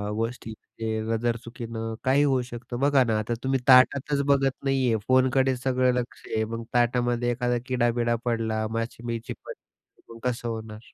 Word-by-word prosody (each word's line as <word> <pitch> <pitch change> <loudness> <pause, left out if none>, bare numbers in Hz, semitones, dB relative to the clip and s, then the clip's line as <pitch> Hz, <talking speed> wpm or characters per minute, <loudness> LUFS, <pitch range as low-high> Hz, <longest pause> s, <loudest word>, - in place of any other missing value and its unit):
गोष्टी 115 0 -3
म्हणजे 110 0 -5
नजर 115 +1 0
चुकीनं 115 -1 -6
काहीही 135 +2 +3
होऊ 130 -3 +2
शकतं. 120 0 -7
बघा 140 -1 +4
ना 110 -3 0
आता 115 +2 -2
तुम्ही 135 0 +1
ताटातच 140 +2 +5
बघत 135 -1 +3
नाही 135 -1 +1
आहे, 115 -2 +2
फोनकडे 130 0 +3
सगळं 130 0 +1
लक्ष 125 -1 -4
आहे. 110 0 0
मग 115 +1 -5
ताटामध्ये 120 0 +1
एखादा 120 0 0
किडा-बिडा 120 -1 +1
पडला, 110 -2 0
माशी-बिशी 115 0 -4
पडली, 115 - -14
मग 115 - -12
कसं 120 0 -4
होणार? 110 -1 -6
120 Hz, 160 wpm, -26 LUFS, 115-130 Hz, -, ताटातच